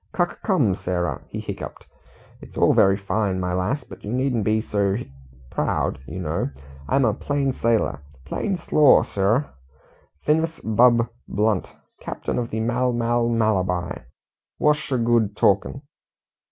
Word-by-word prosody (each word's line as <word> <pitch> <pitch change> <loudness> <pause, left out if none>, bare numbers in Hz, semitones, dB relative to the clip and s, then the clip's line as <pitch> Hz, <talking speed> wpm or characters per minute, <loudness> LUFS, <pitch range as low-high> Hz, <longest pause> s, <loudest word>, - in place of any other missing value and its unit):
"Cuc 175 -1 -1
come, 145 - +2
Sarah," 90 -1 -2
he - - -5
hiccuped. - - -7 0.6
"It's - - -13
all - - +4
very 95 0 +4
fine, 100 -1 -1
my 90 -1 -2
lass, 95 +11 -1
but - - -13
you 105 - -5
needn't 125 -3 0
be 110 +1 +2
so 100 -3 0
hic 120 - -6 0.4
proud, - - -1
you 80 - -7
know. 80 -4 -2 0.4
I'm 135 -1 +3
a 110 - +2
plain 140 +3 -1
sailor 115 - +1 0.3
plain 195 -3 -2
s'lor, 150 -4 +5
Srr'h. 105 +8 +1 0.8
Ph'n'as 160 +2 +1
Bub 115 +2 +4 0.2
blunt, 105 -2 0 0.3
commander - - -3
of 115 - -5
the 110 - -2
Mal 125 +2 +1
Mal 120 0 +1
Malabar. 95 - 0 0.5
Wors' 150 0 +3
'sh 150 -2 -5
good 115 -3 +2
talkin'?" 100 +8 +1
115 Hz, 145 wpm, -23 LUFS, 100-130 Hz, 0.8 s, s'lor